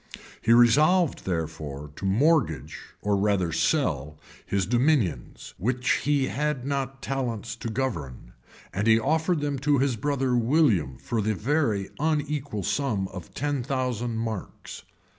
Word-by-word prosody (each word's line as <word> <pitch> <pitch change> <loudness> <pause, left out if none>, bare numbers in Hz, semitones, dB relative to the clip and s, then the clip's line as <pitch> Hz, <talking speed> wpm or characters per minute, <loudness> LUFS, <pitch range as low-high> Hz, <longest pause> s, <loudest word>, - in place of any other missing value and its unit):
He 115 - +2
resolved, 150 +9 +4
therefore, 80 -4 -4
to - - -5
mortgage, 95 - +1 0.2
or 105 0 +2
rather 100 -4 +1
to - - -3
sell, 75 - 0 0.3
his 100 -2 -1
dominions, 120 - 0
which 125 +5 0
he 145 -2 +2
had 150 -2 -2
not 135 -1 -3
talents 120 -5 -3
to 120 - -5
govern; 85 - -4 0.4
and 100 +4 -1
he 110 0 +6
offered 160 +6 +1
them 145 -2 -2
to 145 +1 +2
his 135 -1 +1
brother 135 +1 0
William 115 - +2
for 115 - -2
the 110 +1 0
very 110 - 0
unequal 150 -7 -1
sum 105 -6 -1
of 90 -4 -10
ten 145 -2 -1
thousand 125 -3 -2
marks. 110 -4 -5
120 Hz, 140 wpm, -26 LUFS, 100-140 Hz, 0.4 s, he